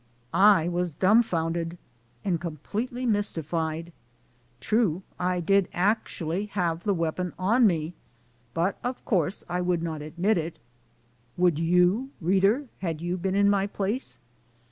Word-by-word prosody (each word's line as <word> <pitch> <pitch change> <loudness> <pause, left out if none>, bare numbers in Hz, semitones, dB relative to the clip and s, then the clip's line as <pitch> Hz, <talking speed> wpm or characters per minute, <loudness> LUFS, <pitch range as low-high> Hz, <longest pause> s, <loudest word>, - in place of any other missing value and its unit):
I 195 -4 +5
was 175 -2 -1
dumfounded 170 -5 +2 0.5
and 175 -4 0
completely 210 - -4
mystified. 165 -6 -1 0.7
True, 205 -6 +1 0.2
I 180 0 0
did 195 +2 +3
actually 190 -1 -1
have 170 -2 0
the 205 - +3
weapon 170 +2 -2
on 220 +6 +4
me, 165 -2 -1 0.6
but 175 +4 0
of 250 +1 -4
course 185 -3 0
I 180 +1 -1
would 175 -2 0
not 160 -3 -3
admit 175 +7 0
it! 165 +1 -5 0.8
Would 175 -4 +3
you 180 +9 +3
reader, 195 - +2
had 165 -4 -3
you 175 +2 -2
been 185 +1 -2
in 200 0 +4
my 200 -1 +2
place? 205 +5 -2
180 Hz, 130 wpm, -27 LUFS, 165-200 Hz, 0.8 s, I